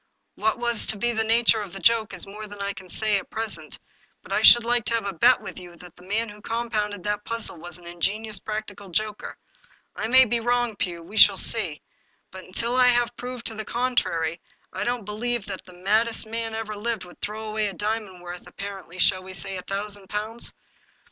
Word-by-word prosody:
What 220 Hz, +2 st, 0 dB
was 235 Hz, -2 st, +1 dB
to 215 Hz, -, -1 dB
be 240 Hz, +4 st, +1 dB
the 220 Hz, -1 st, 0 dB
nature 225 Hz, 0 st, +4 dB
of 200 Hz, -4 st, -7 dB
the 195 Hz, -, -6 dB
joke 220 Hz, +2 st, +3 dB
is 180 Hz, -3 st, -3 dB
more 210 Hz, +2 st, -8 dB
than 205 Hz, 0 st, -10 dB
I 200 Hz, 0 st, -2 dB
can 190 Hz, -2 st, -11 dB
say 215 Hz, +1 st, +1 dB
at -, -, -12 dB
present, 225 Hz, 0 st, -4 dB, 0.5 s
but -, -, -6 dB
I -, -, +2 dB
should 240 Hz, -, +9 dB
like 240 Hz, 0 st, +2 dB
to 230 Hz, -, +1 dB
have 225 Hz, -3 st, -1 dB
a 200 Hz, -, -2 dB
bet 240 Hz, +9 st, +5 dB
with -, -, -7 dB
you 175 Hz, -1 st, -11 dB
that 175 Hz, 0 st, -14 dB
the -, -, -18 dB
man 210 Hz, +5 st, -1 dB
who 210 Hz, 0 st, -12 dB
compounded 215 Hz, -4 st, -2 dB
that 210 Hz, 0 st, -1 dB
puzzle 230 Hz, -6 st, -2 dB
was 175 Hz, +2 st, -7 dB
an 175 Hz, -, -16 dB
ingenious 200 Hz, +5 st, -1 dB
practical 210 Hz, -2 st, -5 dB
joker. 210 Hz, +3 st, -2 dB, 0.6 s
I -, -, -2 dB
may 260 Hz, +2 st, +8 dB
be 235 Hz, 0 st, +1 dB
wrong, 240 Hz, -1 st, +1 dB
Pugh; 175 Hz, -3 st, -3 dB
we 210 Hz, +6 st, -9 dB
shall 200 Hz, -3 st, +8 dB
see. 185 Hz, -11 st, +1 dB, 0.5 s
But, 190 Hz, 0 st, -10 dB
until 235 Hz, +6 st, 0 dB
I 255 Hz, -1 st, +6 dB
have 240 Hz, -1 st, +3 dB
proved 250 Hz, -1 st, -6 dB
the 220 Hz, -, -4 dB
contrary, 180 Hz, -10 st, 0 dB, 0.3 s
I 190 Hz, +2 st, -2 dB
don't 240 Hz, -3 st, -1 dB
believe 225 Hz, +1 st, -2 dB
that 195 Hz, -2 st, -7 dB
the 180 Hz, -, -13 dB
maddest 215 Hz, +6 st, +1 dB
man 225 Hz, 0 st, -3 dB
that -, -, -2 dB
ever 215 Hz, -1 st, -5 dB
lived 220 Hz, -1 st, -3 dB
would 175 Hz, -, -15 dB
throw 215 Hz, +1 st, -4 dB
away 215 Hz, 0 st, 0 dB
a 200 Hz, -, -4 dB
diamond 210 Hz, -3 st, -3 dB
worth, 175 Hz, 0 st, -8 dB
ap -, -, -17 dB
parently, 195 Hz, -3 st, -7 dB
shall 185 Hz, +1 st, +4 dB
we 185 Hz, 0 st, -8 dB
say 195 Hz, +2 st, -3 dB
a 185 Hz, -, -4 dB
thousand 200 Hz, +1 st, -3 dB
pounds 215 Hz, +3 st, -2 dB
210 Hz, 220 wpm, -25 LUFS, 190-230 Hz, 0.6 s, should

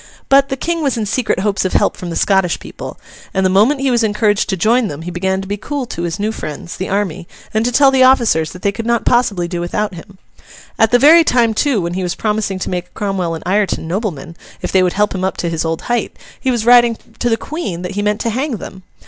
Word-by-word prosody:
But, 275 Hz, 0 st, +5 dB
the 270 Hz, -, -2 dB
King 335 Hz, +4 st, -2 dB
was 275 Hz, -5 st, 0 dB
in 220 Hz, -, -1 dB
secret 220 Hz, -2 st, -1 dB
hopes 205 Hz, -1 st, 0 dB
of 185 Hz, -, -2 dB
help -, -, +2 dB
from 180 Hz, -, -7 dB
the 165 Hz, -, -4 dB
Scottish 190 Hz, -3 st, +2 dB
people; -, -, -9 dB, 0.4 s
and 190 Hz, 0 st, +2 dB
the 185 Hz, -, +3 dB
moment 230 Hz, +9 st, +3 dB
he 270 Hz, -1 st, +1 dB
was 235 Hz, -1 st, +2 dB
encouraged 210 Hz, -1 st, +1 dB
to 190 Hz, -, -1 dB
join 230 Hz, +5 st, +2 dB
them 150 Hz, 0 st, -7 dB
he 175 Hz, -, -5 dB
began 190 Hz, +2 st, -1 dB
to 190 Hz, -, -8 dB
be 205 Hz, +1 st, -3 dB
cool 280 Hz, +5 st, -4 dB
to 170 Hz, -, -6 dB
his 170 Hz, +3 st, -3 dB
new 210 Hz, +2 st, 0 dB
friends, 170 Hz, -4 st, -7 dB
the 190 Hz, -, -4 dB
army, 190 Hz, -3 st, -2 dB, 0.3 s
and 220 Hz, +1 st, +1 dB
to 245 Hz, -, +1 dB
tell 270 Hz, +2 st, +5 dB
the 265 Hz, -1 st, +2 dB
officers 235 Hz, -12 st, +4 dB
that 180 Hz, -, -12 dB
they 200 Hz, -, +2 dB
could 230 Hz, +3 st, -6 dB
not 235 Hz, -1 st, +1 dB
possibly 210 Hz, -8 st, +2 dB
do 170 Hz, -1 st, -4 dB
without 200 Hz, +4 st, -2 dB
him. 185 Hz, +3 st, -12 dB, 0.6 s
At 225 Hz, -, +5 dB
the 245 Hz, -, +5 dB
very 315 Hz, +6 st, +7 dB
time, 240 Hz, -6 st, +2 dB
too, 245 Hz, -2 st, +1 dB
when 170 Hz, 0 st, -3 dB
he 190 Hz, -, -2 dB
was 180 Hz, -1 st, -2 dB
promising 210 Hz, -3 st, -1 dB
to -, -, -3 dB
make 180 Hz, 0 st, -5 dB
Cromwell 190 Hz, -5 st, -2 dB
and 160 Hz, -, -8 dB
Ireton 195 Hz, -3 st, 0 dB
noblemen, 170 Hz, -, -4 dB, 0.2 s
if -, -, -4 dB
they 190 Hz, -, +4 dB
would 180 Hz, -1 st, +1 dB
help 210 Hz, +1 st, +1 dB
him 185 Hz, -1 st, -3 dB
up 190 Hz, -, -1 dB
to 170 Hz, -, -2 dB
his 165 Hz, -1 st, -2 dB
old 165 Hz, 0 st, -3 dB
height, 240 Hz, -1 st, -2 dB, 0.2 s
he 265 Hz, -, -1 dB
was 235 Hz, -3 st, 0 dB
writing 240 Hz, -1 st, +6 dB, 0.2 s
to 240 Hz, -, +1 dB
the 225 Hz, -, +2 dB
Queen 210 Hz, -, -5 dB
that 180 Hz, -, -4 dB
he 205 Hz, +1 st, -2 dB
meant 210 Hz, 0 st, 0 dB
to 230 Hz, -, -1 dB
hang 260 Hz, +1 st, -2 dB
them. 190 Hz, -1 st, -9 dB
205 Hz, 260 wpm, -16 LUFS, 180-240 Hz, 0.6 s, very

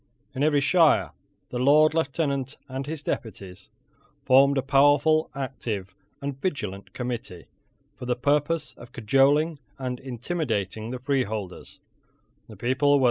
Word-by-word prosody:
In 130 Hz, -, -4 dB
every 145 Hz, -1 st, +3 dB
shire 140 Hz, -, +4 dB, 0.4 s
the 125 Hz, -, -4 dB
Lord 150 Hz, +4 st, +5 dB
Lieutenant 140 Hz, -3 st, -1 dB
and 135 Hz, +1 st, -5 dB
his 155 Hz, -1 st, -5 dB
deputies 95 Hz, -7 st, -6 dB, 0.6 s
formed 135 Hz, +2 st, +5 dB
a 135 Hz, -, +1 dB
powerful, 145 Hz, +3 st, +4 dB
active, 115 Hz, -8 st, -4 dB, 0.3 s
and 140 Hz, -1 st, -5 dB
vigilant 105 Hz, -, -4 dB
committee, 120 Hz, -8 st, -5 dB, 0.5 s
for 125 Hz, -, -7 dB
the 125 Hz, -, +1 dB
purpose 145 Hz, +5 st, 0 dB
of 120 Hz, +1 st, -13 dB
cajoling 140 Hz, +7 st, +2 dB, 0.2 s
and 125 Hz, -2 st, -4 dB
intimidating 120 Hz, -, -3 dB
the 130 Hz, -, -4 dB
freeholders. 110 Hz, -8 st, -3 dB
135 Hz, 115 wpm, -25 LUFS, 120-145 Hz, 0.6 s, Lord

